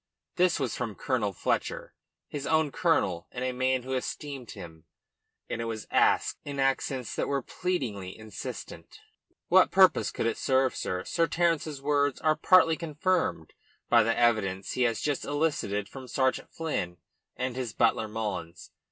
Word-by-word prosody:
This 180 -2 +3
was 130 -5 -1
from 110 -3 -4
Colonel 120 -7 -1
Fletcher 85 - -2 0.3
his 145 -2 -5
own 160 -2 +2
colonel 95 - +1
and 125 0 -3
a 130 - 0
man 130 0 0
who 130 +1 -4
esteemed 130 0 -4
him 80 -2 -10 0.6
and 115 - -3
it - - -3
was 110 -2 -4
asked - - +3
in 140 -1 -5
accents 135 -2 0
that - - -1
were 140 -2 -1
pleadingly 115 - -3
insistent. 110 -3 -8 0.5
"What - - +6
purpose - - +5
could - - -3
it 115 - 0
serve, 130 -1 +2
sir? 90 0 -3
Sir 165 - +1
Terence's 160 -4 0
words 145 -2 +1
are 155 -1 +2
partly 165 -2 +5
confirmed 165 - -1 0.4
by 120 - +6
the 115 +1 +1
evidence 100 -5 +1
he 125 - -2
has 115 - -4
just 145 -2 -1
elicited 145 -9 -1
from 130 +3 -10
Sergeant 130 +1 0
Flynn 90 - -3 0.4
and 125 -1 -2
his 125 -3 -3
butler 110 - +2
Mullins. 105 -6 -5
130 Hz, 160 wpm, -28 LUFS, 110-145 Hz, 0.6 s, What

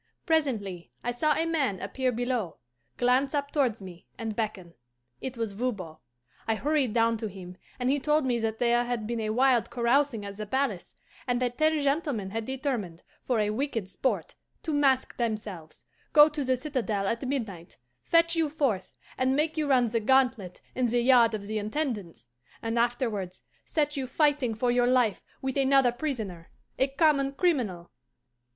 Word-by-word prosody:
Presently 225 - -1
I 245 - 0
saw 300 +5 +1
a 325 - +1
man 280 - 0
appear 260 -1 -1
below, 245 -6 -2 0.4
glance 255 +4 +2
up 285 0 -1
towards 245 -8 0
me, 180 -2 -11
and 225 -2 -4
beckon. 205 -6 -3 0.5
It 260 -2 -5
was 225 -2 -2
Voban. 200 -7 -4 0.5
I 225 - +2
hurried 285 -1 +1
down 230 0 +2
to 220 0 -4
him, 185 -2 -9 0.2
and 250 - -1
he 280 +2 +2
told 300 +1 +2
me 245 -2 +1
that 225 -1 -2
there 240 0 +3
had 240 -3 -2
been 235 +1 -2
a 215 -1 -2
wild 250 +1 +3
carousing 240 -2 +1
at 200 0 -7
the 215 0 -5
palace, 265 +5 -2 0.3
and 245 -1 +1
that 245 -1 -2
ten 310 0 +3
gentlemen 280 - -1
had 225 +1 -3
determined, 250 - -3 0.2
for 245 -3 +2
a 210 0 +1
wicked 225 -4 -2
sport, 260 +7 -2 0.3
to 315 - -2
mask 275 -3 +2
themselves, 210 -9 -4 0.3
go 295 -1 +9
to 300 -1 -3
the 260 -1 +1
citadel 240 -8 -2
at 235 +4 -2
midnight, 210 -11 -4 0.3
fetch 335 0 +3
you 325 -2 +1
forth, 260 -11 -1 0.2
and 260 +1 +2
make 310 +2 +1
you 310 -2 0
run 255 -3 +4
the 230 +1 0
gauntlet 235 -6 +1
in 255 -1 +1
the 240 +1 +1
yard 240 -3 +5
of 205 -2 -6
the 215 +1 -2
Intendance, 210 - -4 0.4
and 230 +1 0
afterwards 230 -6 -1 0.2
set 295 -1 0
you 270 -2 -3
fighting 280 -4 +1
for 245 +2 +1
your 245 0 +3
life 245 -5 +2 0.2
with 265 +1 -2
another 270 -2 +4
prisoner, 225 - -4 0.3
a 265 - +4
common 275 -1 +2
criminal. 245 - 0
245 Hz, 175 wpm, -28 LUFS, 215-275 Hz, 0.5 s, go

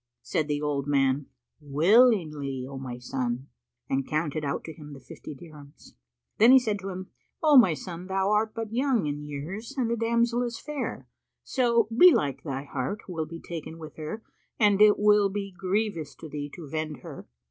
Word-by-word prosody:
Said 155 - -1
the 145 -1 -1
old 145 -1 -1
man, 135 -1 +2 0.3
"Willingly, 150 - +3
O 135 0 -7
my 125 -2 -6
son," 125 +1 -3 0.4
and 135 0 -1
counted 155 -1 -1
out 140 -1 -2
to 160 - -8
him 150 -2 -11
the 135 - -10
fifty 150 - -10
dirhams. 150 -2 -14 0.5
Then 230 +4 +8
he 265 - +9
said 220 -5 0
to 195 0 -6
him, 185 0 -7 0.3
"O 305 -2 +6
my 190 - +7
son, 175 +2 -8
thou 190 +1 0
art 215 +1 +1
but 225 -1 -5
young 250 - +1
in 145 0 -3
years 160 - -6
and 240 -3 0
the - - +2
damsel 235 +1 +1
is 240 -2 -3
fair, 300 -1 -5 0.4
so 235 -4 +2
belike 230 - +5
thy 135 -3 -4
heart 140 +9 -4
will 165 -4 -3
be 165 +1 -8
taken 165 -1 -7
with 155 -2 -10
her 160 +9 -6 0.4
and 205 -2 +4
it 210 -1 +7
will 210 -1 +4
be 200 0 -4
grievous 185 -6 -2
to 160 - -10
thee 145 -1 -5
to 170 -4 -9
vend 155 0 -4
her. - - -10
170 Hz, 185 wpm, -27 LUFS, 145-215 Hz, 0.5 s, he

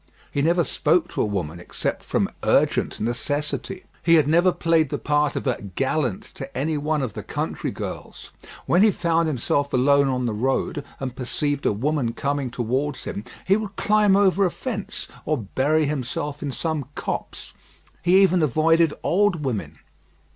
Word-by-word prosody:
He 140 - 0
never 170 +3 +3
spoke 165 +3 +1
to - - -2
a - - +2
woman 85 -6 -3
except 90 - -3
from - - 0
urgent - - +2
necessity. 145 - -2 0.2
He 165 -1 +5
had 155 -3 +4
never 170 +4 +4
played 165 -4 +2
the - - -2
part 150 -1 +1
of - - -3
a 130 -3 0
"gallant" 125 - -1
to 135 -1 -8
any 155 +4 0
one 150 0 0
of 120 -6 -3
the - - -5
country - - -3
girls. - - -7 0.3
When 175 - +3
he 215 - +7
found 170 -3 +1
himself 140 0 0
alone 140 +2 +4
on 125 -1 0
the 115 - -1
road, 135 +5 -1 0.2
and 130 -2 -4
perceived 145 +3 -1
a - - +3
woman 125 +2 -1
coming 140 -1 -1
towards 130 +4 -2
him, 105 - -5 0.2
he 195 - +4
would 210 -2 -5
climb 210 -2 +3
over 200 -1 +4
a 185 - +3
fence, 210 +1 -5 0.2
or 155 - 0
bury 140 +8 +1
himself 145 +1 -3
in 145 - -3
some 155 +1 -2
copse: - - -5 0.5
he 185 +3 +5
even 185 -2 +3
avoided 160 +2 +3
old 180 -4 +2
women. 100 - -3
150 Hz, 170 wpm, -23 LUFS, 130-170 Hz, 0.5 s, he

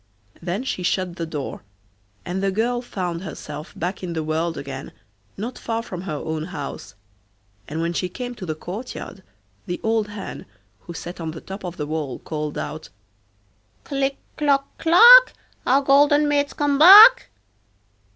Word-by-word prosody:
Then 180 +7 -3
she 265 - -4
shut 180 0 -2
the 165 - -4
door, 150 -4 -6 0.6
and 180 +2 -3
the 195 - +1
girl 235 +5 -1
found 180 -8 -5
herself 155 -4 -8
back 180 +4 -4
in 180 -2 -5
the 160 -1 -3
world 160 +2 -2
again, 135 -1 -7 0.4
not 230 +6 -6
far 230 0 -3
from 180 -6 -7
her 175 -5 -5
own 155 +1 -4
house; 150 - -8 0.7
and 155 +2 -4
when 170 +1 -2
she 180 +1 -2
came 245 +6 -6
to 215 -6 -9
the 155 - -3
courtyard 195 +3 -8 0.5
the 175 - -4
old 220 -1 0
hen, 205 -2 -8 0.4
who 170 - -8
sat 175 +1 -8
on 160 - -4
the 160 +1 -7
top 195 +1 -9
of 175 -1 -6
the 150 - -3
wall, 150 -4 -4
called 150 -1 -5
out: - - -6 0.9
'Click, 275 -1 -2 0.2
clock, 280 -2 0
clack, 475 +10 +8 0.3
Our 275 +2 +3
golden 290 +2 +4
maid's 290 -1 0
come 285 -1 0
back. 425 +9 +9
190 Hz, 160 wpm, -22 LUFS, 165-270 Hz, 0.9 s, back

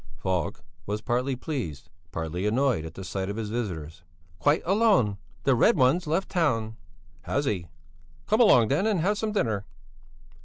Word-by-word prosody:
Falk 95 -2 -2 0.2
was 105 +1 -2
partly 125 +3 -1
pleased, 85 - -5 0.2
partly 80 +5 -3
annoyed 120 - +1
at 80 - -9
the 95 - -7
sight 95 +1 -3
of 100 - -3
his 110 -1 -4
visitors. 85 -9 -4 0.4
"Quite 145 +2 +2
alone; 195 - +3 0.3
the 135 - +4
Red 175 - +4
One's 150 +6 +3
left 170 +6 0
town." 115 - 0 0.5
"Has 140 - -1
he? 95 -9 -2 0.6
Come 215 +3 +3
along 120 - +6
then 170 +10 +2
and 205 -6 +1
have 205 +4 +1
some 220 -1 -1
dinner." 110 - 0
120 Hz, 160 wpm, -27 LUFS, 95-160 Hz, 0.6 s, along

